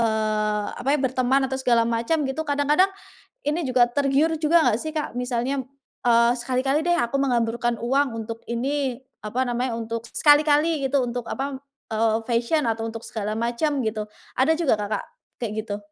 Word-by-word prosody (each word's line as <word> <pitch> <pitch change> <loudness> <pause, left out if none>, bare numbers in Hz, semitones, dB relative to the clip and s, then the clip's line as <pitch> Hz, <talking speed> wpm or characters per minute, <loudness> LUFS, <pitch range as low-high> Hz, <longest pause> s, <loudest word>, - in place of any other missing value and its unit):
eee, 215 -2 0 0.2
apa 265 - -4
ya 285 - +4
berteman 260 +1 +2
atau 265 - -1
segala 235 -3 +3
macam 235 +7 0
gitu 290 +3 -3
kadang-kadang 290 +6 +3 0.5
ini 305 +3 -1
juga 250 -2 +3
tergiur 285 +5 +2
juga 315 -2 +4
enggak 220 - +1
sih 315 +5 -5
Kak, 300 -6 -3
misalnya, 250 +2 -1 0.4
eee, 235 0 +5
sekali-kali 265 +5 0
deh 350 - +3
aku 275 -6 0
menghamburkan 240 -3 +1
uang 250 -1 +1
untuk 230 +1 -7
ini 260 +2 -2 0.2
apa 230 +5 -1
namanya 245 0 -1
untuk 230 0 -4
sekali-kali 295 +2 +4
gitu 275 +1 +2
untuk 245 -1 -3
apa, 270 +3 -3 0.3
eee, 220 0 +2
fashion 240 +6 +1
atau 225 0 -2
untuk 225 0 -6
segala 215 -1 -4
macam 240 +6 0
gitu, 215 -1 -2 0.3
ada 275 +5 +4
juga 315 -9 +2
Kakak 205 0 -2 0.4
kayak 225 -3 -2
gitu? 205 -2 -3
250 Hz, 165 wpm, -24 LUFS, 230-285 Hz, 0.5 s, eee